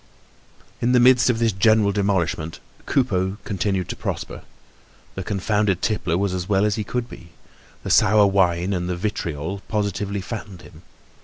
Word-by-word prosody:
In 125 +2 +2
the 125 - +5
midst 125 +1 +5
of 120 - +2
this 115 -1 +2
general 105 +1 +3
demolishment, 95 -5 -1 0.3
Coupeau 95 -7 0
continued 95 -2 -1
to - - -3
prosper. - - -5 0.7
The 95 - -5
confounded 105 -1 0
tippler 95 -6 0
was 100 0 0
as 90 0 -4
well 100 0 +3
as 105 -1 +1
well 105 - -3
could 120 +3 -3
be. 85 - -12 0.5
The - - -3
sour 105 +1 +5
wine 95 -1 +2
and 90 -1 -2
the 90 - -1
"vitriol" 85 -2 -4
positively 100 -1 -2
fattened 100 -3 -7
him. 80 -1 -15
100 Hz, 160 wpm, -22 LUFS, 90-110 Hz, 0.7 s, the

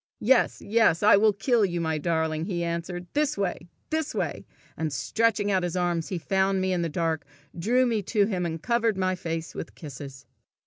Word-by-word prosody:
"Yes, 255 +3 +2
yes, 215 -5 +3
I 205 - +8
will 215 +2 +5
kill 220 +3 +2
you, 175 -3 0
my 160 -2 -1
darling!" 160 0 0
he 175 -3 -2
answered, 170 +1 -3
" - - -46
this 300 -3 +1
way! 180 -3 -2 0.2
this 315 -1 -1
way!" - - -3 0.3
and 160 -1 -2
stretching 210 +6 +1
out 190 -1 +2
his 175 0 -2
arms 175 -2 0
he 185 - -3
found 190 +3 +1
me 185 0 0
in 175 - 0
the 165 - -1
dark, 160 0 -1 0.3
drew 240 +9 +2
me 230 -3 +1
to 210 -3 +3
him, 190 -4 -2
and 165 -1 -3
covered 230 +1 +1
my 185 0 +1
face 165 -2 -4
with - - -7
kisses. 140 -2 -9
185 Hz, 200 wpm, -26 LUFS, 165-215 Hz, 0.3 s, I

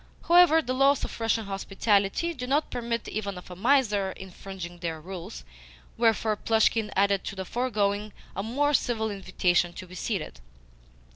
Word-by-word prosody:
However, 340 -2 +6
the 255 - -2
laws 275 +1 +3
of - - -8
Russian 225 -1 0
hospitality 200 - 0
do 250 -5 -6
not 290 +4 +1
permit 235 -2 -3
even 200 -3 -4
of 180 - -11
a - - -7
miser 210 -3 +2
infringing 185 -2 -9
their 165 -2 -4
rules; 185 +4 -8 0.5
wherefore 225 -2 +2
Plushkin 220 0 +2
added 200 0 +2
to 200 - -5
the 190 -1 -5
foregoing 210 -3 -1 0.2
a - - -2
more 280 +7 0
civil 225 -4 +1
invitation 180 -3 +1
to 185 - -8
be 180 - -14
seated. 185 - -4
210 Hz, 155 wpm, -27 LUFS, 190-240 Hz, 0.5 s, However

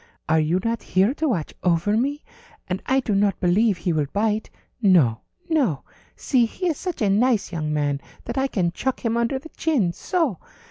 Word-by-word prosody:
Are 160 +1 +3
you 160 +4 +1
not 230 -1 -1
here 195 +6 +2
to 315 +2 -1
watch 175 - -2
over 180 +4 +2
me? 280 +6 -1 0.4
And 185 +1 -3
I 265 +1 +3
do 220 - -1
not 200 -1 +2
believe 195 +3 +3
he 175 0 -1
will 150 -2 0
bite. 215 +1 0 0.3
No, 160 - +4 0.3
no. 275 - +1 0.3
See, 245 -4 +2
he 365 - -6
is 310 - -1
such 360 - -3
a 205 - +3
nice 225 +1 +2
young 155 -3 -2
man 145 -2 0 0.2
that - - -4
I 270 0 +1
can 180 -9 0
chuck 255 +7 -3
him 230 0 +1
under 235 +3 +1
the 305 +5 -10
chin. 255 - 0
So!" 320 - -1
210 Hz, 195 wpm, -23 LUFS, 175-260 Hz, 0.4 s, No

